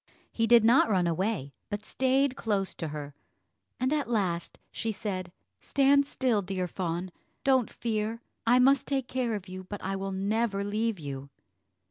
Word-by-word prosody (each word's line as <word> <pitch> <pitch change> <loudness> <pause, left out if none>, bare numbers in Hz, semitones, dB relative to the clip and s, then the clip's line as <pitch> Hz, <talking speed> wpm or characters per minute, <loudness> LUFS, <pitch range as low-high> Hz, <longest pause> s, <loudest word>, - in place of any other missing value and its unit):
He 225 0 +1
did 235 -1 +7
not 235 +1 +5
run 185 -4 +3
away, 170 -4 -1 0.2
but 210 0 -4
stayed 265 0 +2
close 200 -6 -1
to 165 - -4
her; 145 -1 -6 0.7
and 260 +3 +1
at 295 -5 -1
last 185 -7 -1
she 225 - -2
said, 185 -4 -4 0.3
"Stand 280 0 +3
still, 250 -7 +1
dear 185 -1 -2
fawn; 175 +1 -3 0.3
don't 260 -4 +3
fear, 225 0 -2 0.2
I 245 +2 +6
must 270 +2 +4
take 270 -3 0
care 245 -3 -1
of 200 -2 -6
you, 185 0 -7
but 205 +2 -6
I 195 +1 -1
will 195 0 -3
never 200 +1 0
leave 215 +1 -1
you." 140 -2 -6
210 Hz, 165 wpm, -29 LUFS, 185-245 Hz, 0.7 s, did